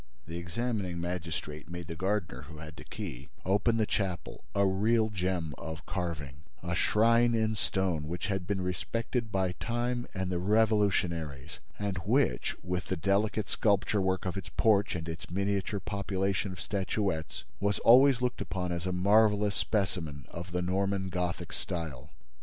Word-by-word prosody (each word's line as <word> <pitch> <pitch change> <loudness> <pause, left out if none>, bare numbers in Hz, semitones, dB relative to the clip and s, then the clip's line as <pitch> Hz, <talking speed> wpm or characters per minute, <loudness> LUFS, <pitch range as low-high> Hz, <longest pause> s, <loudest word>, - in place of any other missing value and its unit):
The 85 +2 -5
examining 95 0 -2
magistrate 85 -3 -4
made 85 0 -5
the 85 - -6
gardener, 95 -7 -1
who 80 -2 -10
had 80 0 -9
the - - -10
key, 65 +4 -7 0.2
open 105 +4 +3
the 110 - +3
chapel, 95 -4 -2
a 100 0 +4
real 110 +3 +3
gem 90 -5 -1
of 80 +1 -6
carving, 80 -7 -3 0.3
a 85 -1 -2
shrine 115 +6 +4
in 110 -1 +2
stone 95 -7 0
which 85 +3 -3
had 95 -3 -2
been 100 -2 0
respected 115 +6 -2
by 95 -2 +1
time 120 +1 -1
and 95 -1 -1
the 90 - 0
revolutionaries, 95 -8 +1 0.2
and 100 -2 -2
which, 95 - +1
with 90 0 -2
the 95 - -1
delicate 100 +4 +1
sculpture 100 -1 +2
work 95 0 0
of 95 +1 -2
its 95 - -5
porch 105 -4 +3
and 80 -1 -4
its 80 -2 -6
miniature 100 +2 0
population 100 -1 -1
of 90 - -8
statuettes, 95 -4 -1 0.2
was 100 0 +1
always 125 +1 +6
looked 125 - 0
upon 90 +2 -2
as 85 +1 -2
a - - 0
marvelous 105 +2 +4
specimen 85 - -1
of 85 +2 -7
the 90 0 0
Norman 95 +1 0
Gothic 90 -1 -2
style. 80 -7 -4
95 Hz, 160 wpm, -31 LUFS, 85-105 Hz, 0.3 s, always